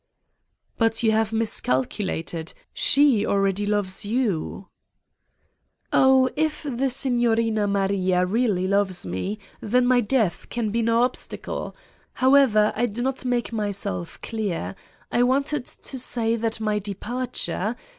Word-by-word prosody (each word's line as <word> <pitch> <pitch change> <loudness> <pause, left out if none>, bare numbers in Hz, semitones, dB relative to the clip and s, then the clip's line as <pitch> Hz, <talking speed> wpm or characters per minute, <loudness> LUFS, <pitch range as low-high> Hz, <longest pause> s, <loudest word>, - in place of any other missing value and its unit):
"But 225 0 +1
you 220 - +4
have 220 0 +1
miscalculated: 165 - -2 0.2
she 275 -7 +3
already 195 0 +1
loves 205 -1 0
you." 205 -5 -1 1.3
"Oh, 265 0 +5
if 310 0 -1
the 270 -2 -1
Signorina 230 -4 +1
Maria 195 -2 +1
really 200 -2 +1
loves 200 - 0
me 95 - -3 0.2
then 245 +4 +2
my 250 0 +4
death 220 -5 0
can 230 -3 -2
be 230 +2 0
no 230 +1 +3
obstacle: 250 - -4 0.4
however, 255 -5 +4
I 240 +2 +1
do 235 +2 -4
not 265 0 -2
make 245 -1 -1
myself 200 - -3
clear. 195 - -3 0.4
I 240 - +2
wanted 270 +2 +1
to 265 - -8
say 230 -2 0
that 225 -1 -2
my 215 -1 0
departure 220 +1 -3
225 Hz, 125 wpm, -24 LUFS, 200-245 Hz, 1.3 s, Oh